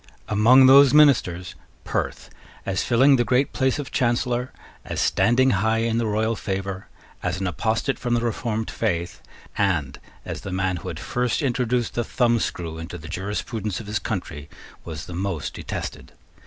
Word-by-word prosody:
Among 120 +5 +6
those 135 +1 +7
ministers 95 - +4 0.3
Perth, - - -3 0.3
as 95 -1 -1
filling 130 +3 +4
the 120 - +2
great 125 +4 +1
place 130 -1 +1
of 145 -2 -6
Chancellor, 125 0 0 0.3
as - - -5
standing 130 +3 +3
high 110 +3 +1
in 115 0 0
the 115 - 0
royal 110 +2 0
favour, 95 -2 -4 0.3
as - - -2
an 95 - -2
apostate 110 - -1
from 120 -1 0
the 115 - +1
reformed 115 -1 -2
faith, 85 -6 -2 0.4
and 85 -9 0 0.3
as - - -5
the 95 - -6
man 95 0 -1
who 85 - -9
had 85 -3 -5
first 125 +4 -1
introduced 125 -2 0
the 120 - -1
thumbscrew 110 -10 -1
into 80 +2 -7
the 80 - -10
jurisprudence 105 +3 -4
of 110 - -8
his 105 +1 -2
country, 80 -9 -5 0.3
was 80 -3 -7
the 90 - -8
most 90 -4 -3
detested. - - -6
110 Hz, 165 wpm, -23 LUFS, 95-125 Hz, 0.4 s, those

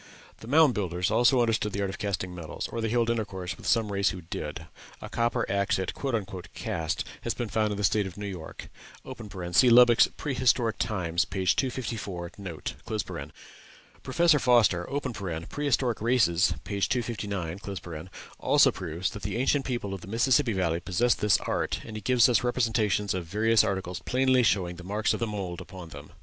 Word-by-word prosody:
The 110 - -11
Mound 150 0 +5
Builders 90 -1 -1
also 120 +3 +4
understood 110 -3 0
the 100 - -2
art 100 -1 -1
of - - -9
casting 95 -3 -3
metals, 85 -3 -6
or 115 - -4
they 115 - -1
held 115 0 +2
intercourse 95 -5 -3
with - - -9
some 110 -3 +2
race 100 0 +2
who 95 -3 -6
did; 80 - -6 0.3
a - - -8
copper 115 0 0
axe 100 0 +1
it 95 -1 -3 0.6
"cast" 80 -1 -2 0.2
has - - -2
been 120 -3 -3
found 110 -1 +1
in 105 - -3
the 105 - -3
State 100 0 +2
of 95 - -10
New 105 - -5
York. 90 -5 -7 0.8
(See 125 +7 +6
Lubbock's 120 0 +7
"Prehistoric 125 -5 0
Times," 95 -6 0
p. 95 0 -4
254, 100 -6 -1
note.) 90 -5 -5 1.3
Professor 155 +3 +3
Foster 115 -9 +3 0.6
("Prehistoric 130 -6 0
Races," 100 -7 +3
p. 100 +1 -4
259) 100 -7 -3 0.3
also - - +5
proves 85 +1 -3
that 105 - -8
the - - -3
ancient 135 +2 +1
people 120 -6 -3
of 95 - -6
the - - -11
Mississippi 120 +3 +2
Valley 85 -3 0
possessed 100 +7 +1
this 105 -1 +4
art, - - -1
and 110 - -8
he 110 - -5
gives 120 +3 +4
us 120 -3 +2
representations 110 -5 +1
of 90 -2 -3
various 110 +6 +3
articles 95 -4 -2
plainly 130 0 +3
showing 90 -6 +1
the 90 - -10
marks 105 +4 0
of - - -3
the 115 - -1
mould 95 -5 -4
upon 90 -4 -10
them. 75 +1 -11
105 Hz, 175 wpm, -27 LUFS, 95-120 Hz, 1.3 s, Lubbock's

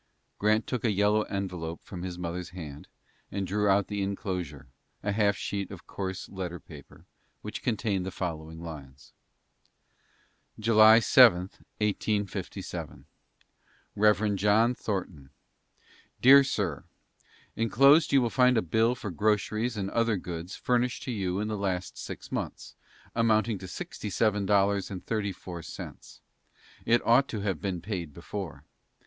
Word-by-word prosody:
Grant 110 +2 +2
took 125 -4 -3
a 115 - +2
yellow 105 +1 +3
envelope 90 -5 -4
from 90 - -8
his 90 -1 -5
mother's 90 0 -4
hand, 75 -6 -9 0.4
and 100 0 -2
drew 105 +2 0
out 100 0 +4
the 100 -1 -3
inclosure, 90 -8 -4 0.4
a 105 - 0
half 100 -1 +2
sheet 100 -2 -3
of 95 -3 -10
coarse 95 -1 -5
letter 90 -2 -5
paper, 75 -4 -14 0.4
which 105 - -6
contained 105 -5 -1
the 95 - -3
following 80 -3 -5
lines: 70 -5 -10 1.5
"July 110 0 +7
7, 115 -5 +7 0.4
1857. 105 - -3 0.9
REV. 105 0 +3
JOHN 105 +5 +3
THORNTON: 95 - -4 0.9
DEAR 140 +2 +8
SIR: 100 - -2 0.7
Inclosed 140 +8 +5
you 135 -2 +5
will 120 - -1
find 125 -1 +4
a 110 - +2
bill 110 +7 +2
for 105 -5 -6
groceries 110 +5 0
and 95 -1 -3
other 115 -2 +1
goods 90 +1 -6
furnished 125 0 0
to 130 - -4
you 95 -4 -2
in 105 - -1
the 110 - -2
last 95 -3 -2
six - - -8
months, - - -5 0.4
amounting 110 -2 +2
to 95 - -8
sixty 105 +3 -6
seven 105 -1 +1
dollars 100 -1 +2
and 95 -2 -7
thirty 105 -3 -1
four 90 -2 -8
cents 80 - -10 0.6
($67.34). - - -24
It - - -1
ought 125 +4 +5
to 110 -6 -4
have 95 -6 -2
been 95 -4 -3
paid 85 -6 -5
before. 90 0 -6
100 Hz, 145 wpm, -28 LUFS, 90-110 Hz, 1.5 s, DEAR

